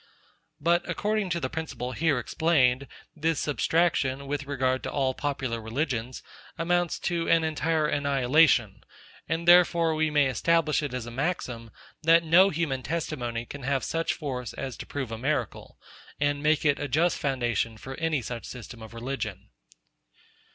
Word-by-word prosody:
But 170 +3 +3
according 210 +2 -1
to 170 0 -1
the 130 - -2
principle 145 -4 -5
here 150 +2 +1
explained, 135 -1 +2 0.3
this 160 0 0
substraction, 145 -3 +1
with 145 0 -3
regard 130 -2 0
to - - -5
all 135 -2 0
popular 135 -5 -3
religions, 125 +1 -3 0.3
amounts 175 +1 +1
to 170 -1 -1
an 165 -1 +4
entire 160 0 0
annihilation; 140 -6 +3 0.5
and 165 +1 -2
therefore 170 -2 +6
we 155 0 +1
may 150 -1 +3
establish 155 +4 +2
it 145 -4 -4
as 125 -2 -4
a 120 - -7
maxim, 125 -5 -3 0.3
that 165 +1 +5
no 175 +4 +6
human 150 -6 -1
testimony 120 -7 -3
can 140 +3 -9
have 135 -1 -1
such 165 +1 -1
force 130 -5 -5
as 135 -2 -5
to - - -8
prove 135 -5 -4
a 115 - -5
miracle, 130 -3 -3 0.4
and 145 0 0
make 155 +1 +2
it 145 -1 +3
a 145 - -2
just 160 +6 +1
foundation 120 -5 -1
for 130 +4 -8
any 160 -5 0
such 115 +1 -6
system 120 -1 -9
of 110 +1 -10
religion. 110 -5 -5
145 Hz, 160 wpm, -27 LUFS, 125-165 Hz, 0.5 s, therefore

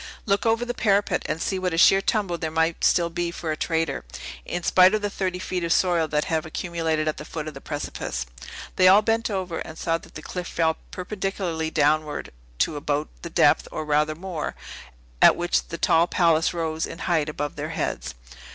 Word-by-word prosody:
Look 200 +2 +1
over 225 +2 +2
the 245 - -3
parapet, 200 -5 +2
and 155 +1 -2
see 190 +3 -1
what 180 -2 -1
a - - -3
sheer 195 +3 +6
tumble 195 -4 0
there 160 - -2
might 160 +1 0
still 170 -1 +3
be 175 0 -2
for 170 -1 -4
a - - -1
traitor, 160 -3 -1 0.4
in 175 - -3
spite 185 +4 +6
of 215 - -2
the 205 - -1
thirty 185 -2 -2
feet 180 -1 -3
of 165 - -1
soil 175 -3 +3
that 150 0 0
have 160 -1 0
accumulated 160 -1 -2
at 155 - -1
the - - -6
foot 155 0 -6
of 155 - -5
the 135 - -10
precipice." 145 - -4 0.5
They 185 - +6
all 200 +3 +7
bent 225 +1 +1
over, 185 -5 -3
and 160 - -7
saw 165 -1 0
that - - -17
the 155 - -8
cliff 180 -1 -5
fell 160 -1 +1
perpendicularly 180 -4 -3
downward 155 0 +1 0.3
to 145 - +1
about 145 +1 -1
the - - -6
depth, - - +3
or 155 - -4
rather 150 +1 +1
more, 170 -2 -5 0.7
at - - +8
which - - 0
the - - -5
tall 165 +1 +3
palace 165 -3 +3
rose 160 -2 -2
in - - -8
height 160 -4 0
above 145 -1 -4
their - - -4
heads. - - -3
165 Hz, 205 wpm, -24 LUFS, 155-185 Hz, 0.7 s, at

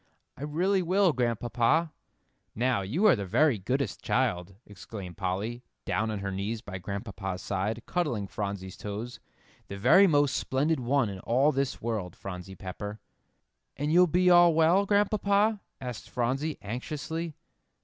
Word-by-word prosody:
"I - - -14
really 180 +7 +1
will, 185 0 +3
Grandpapa." 120 +6 +1 0.6
"Now, 120 -2 +1
you 140 - 0
are 205 - +7
the 100 - -4
very 140 - +3
goodest 125 +3 -2
child," 90 +2 0
exclaimed 100 -2 -9
Polly, 100 +5 -2 0.2
down 110 +4 0
on 110 - -2
her 100 0 -3
knees 100 +4 -3
by 95 -5 -7
Grandpapa's 95 -1 -5
side, 105 +4 -2
cuddling 150 - -1
Phronsie's 100 -2 -5
toes, 105 +4 -6 0.5
"the 100 - -7
very 190 - +6
most 145 -4 +3
splendid 145 +4 0
one 130 0 +1
in 100 -2 -6
all 130 +9 +2
this 135 -4 -2
world, 105 -7 -3
Phronsie 95 0 -8
Pepper." 105 +4 -7 0.8
"And 145 +3 -1
you'll 180 +1 +6
be 180 +2 +2
all 175 -2 +7
well, 170 +5 +4
Grandpapa?" 205 +1 +2 0.2
asked 125 -3 -7
Phronsie, 135 +6 -1
anxiously. 150 +8 -4
120 Hz, 145 wpm, -28 LUFS, 100-160 Hz, 0.8 s, are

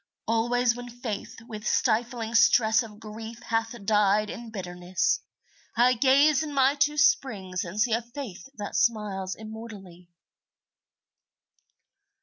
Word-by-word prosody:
Always 235 +2 +2
when 245 0 -8
Faith 240 -4 -6
with 215 -3 -8
stifling 230 -1 0
stress 230 0 +5
Of 215 -3 -10
grief 225 +1 -8
hath 225 +1 -1
died 210 0 +3
in 235 -1 -8
bitterness, 180 - -1 0.6
I 245 +2 +5
gaze 275 +4 +4
in 300 -2 -5
my 270 0 +4
two 295 +1 +1
springs 210 - +1
and 185 +4 -6
see 230 +1 +2
A 230 - +1
Faith 240 -2 -9
that 205 -1 -6
smiles 205 -4 0
immortally. 210 -5 -10
225 Hz, 125 wpm, -27 LUFS, 210-245 Hz, 0.6 s, stress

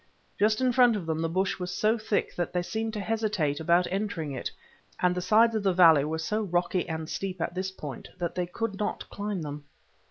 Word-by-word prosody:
Just 215 +3 +3
in 255 -1 +3
front 245 -2 +5
of 195 -5 -4
them 160 0 -1
the 165 - 0
bush 190 +3 0
was 180 0 -3
so 215 +5 +2
thick 220 -2 -1
that 175 -2 -2
they 180 -1 0
seemed 220 +4 -2
to 215 - -3
hesitate 210 -9 0
about 170 +3 +3
entering 190 -6 -2
it, 130 - -3 0.5
and 180 0 +3
the 180 - -2
sides 220 +5 +4
of 220 - 0
the 195 -2 +2
valley 165 -5 +7
were 160 +1 -2
so 210 +7 -1
rocky 180 -2 0
and 160 -1 -3
steep 190 +1 -4
at 170 - -2
this 185 +1 -2
point 150 -8 -8
that 175 -2 -2
they 180 -1 -2
could 205 +2 -4
not 210 - -2
climb 205 -4 -3
them. 145 0 -6
185 Hz, 225 wpm, -28 LUFS, 165-210 Hz, 0.5 s, valley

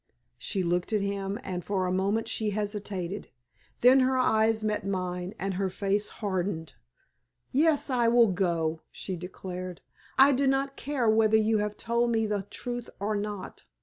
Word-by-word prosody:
She 195 -3 -2
looked 175 +4 0
at 210 - +2
him, 200 +1 -2
and 180 -2 -4
for 190 -1 -1
a 180 - 0
moment 200 +4 0
she 215 -1 -1
hesitated. 205 -2 -3 0.5
Then 255 +2 +7
her 260 0 +3
eyes 220 -3 +3
met 215 -1 -1
mine, 185 -1 -3
and 195 +1 -2
her 190 +1 -1
face 200 +2 -1 0.2
hardened. 180 -4 -2 0.8
"Yes, 300 +1 +3
I 240 -2 +3
will 230 -2 +5
go," 165 -4 0
she 190 - -5
declared. 180 0 -7 0.4
"I 270 +2 +8
do 275 +1 +2
not 270 +1 +1
care 280 -5 -1
whether 220 0 +5
you 220 0 +2
have 210 0 -2
told 235 +1 +1
me 225 -1 +2
the 205 -2 -2
truth 245 -1 -4
or 210 +2 -1
not. 205 -2 -5
205 Hz, 165 wpm, -28 LUFS, 185-230 Hz, 0.8 s, I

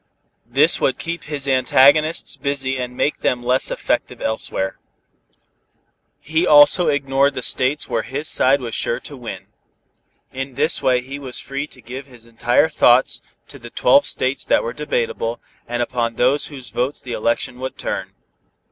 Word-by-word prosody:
This - - +3
would - - +1
keep 170 +1 -5
his 145 -2 -4
antagonists 140 +5 +3
busy 135 -2 -2
and 125 0 -5
make 150 - 0
them 120 -1 0
less 125 +2 +2
effective - - -2
elsewhere. 95 -3 -2 1.4
He 160 +4 0
also 145 +4 +6
ignored 140 0 +1
the 125 - -4
states 130 +3 0
where - - -1
his 145 +4 -5
side 135 +1 +3
was 115 -2 -5
sure 120 +1 -1
to 145 - -9
win. 120 -3 -8 0.9
In 135 0 -5
this 155 +4 +1
way 125 -1 +2
he 135 +3 -8
was 130 -3 -3
free 140 +2 -5
to 130 - -16
give 130 +4 -8
his 120 -3 -15
entire 115 +5 +2
thoughts 130 -5 +3 0.3
to 140 - -11
the 120 -1 -10
twelve 280 - +4
states 130 0 0
that - - +2
were 115 - -4
debatable, 120 -5 -2 0.3
and 120 0 -1
upon 115 -1 -2
whose 135 0 0
votes 130 +4 -2
the 125 - -7
election 115 +2 -1
would 130 0 -5
turn. - - -4
130 Hz, 160 wpm, -20 LUFS, 120-145 Hz, 1.4 s, also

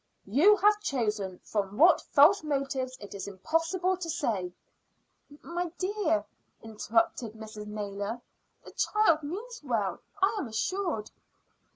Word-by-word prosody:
You 300 - +5
have 420 +1 +4
chosen, 210 - -1
from 205 -1 -3
what 335 +3 +6
false 310 +8 +5
motives 275 -3 -2
it 205 - -10
is 200 - -6
impossible 330 - 0
to 345 -2 -5
say 220 - -1 0.5
" 290 0 -22
"My 345 +1 -3
dear," 370 -5 0 0.4
interrupted 225 +1 0
Mrs. 215 -1 -9
Naylor, 205 +1 -4 0.5
"the - - -10
child 425 -7 +2
means 420 +11 -6
well, 220 -9 -1 0.2
I 390 +3 +2
am 285 - -3
assured." 260 - -2
275 Hz, 130 wpm, -29 LUFS, 210-355 Hz, 0.5 s, what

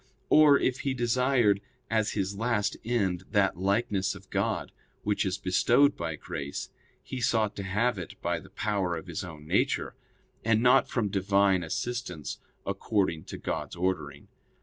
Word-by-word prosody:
Or, 150 -2 +8
if 130 0 0
he 135 -2 -1
desired 120 -4 +2 0.3
as 110 -2 +1
his 100 -1 -1
last 110 -1 0
end 100 -7 0
that 95 -5 +2
likeness 100 -1 +1
of - - -14
God - - -1 0.3
which 105 -1 +1
is 95 +1 -1
bestowed 120 +10 +3
by 80 - -3
grace, 70 -1 -5 0.3
he 130 - -5
sought 110 -3 +1
to 100 - -3
have 105 +3 0
it 85 - -8
by - - -1
the - - -15
power 100 -5 -1
of 80 - -8
his 85 +1 -5
own 80 -4 -9
nature; - - +1 0.5
and 110 -1 +3
not 125 +2 +5
from 110 -5 0
Divine 100 -1 +3
assistance 90 - -4 0.3
according 95 -7 0
to - - -7
God's - - -4
ordering. 85 -6 -2
100 Hz, 155 wpm, -28 LUFS, 95-120 Hz, 0.5 s, Or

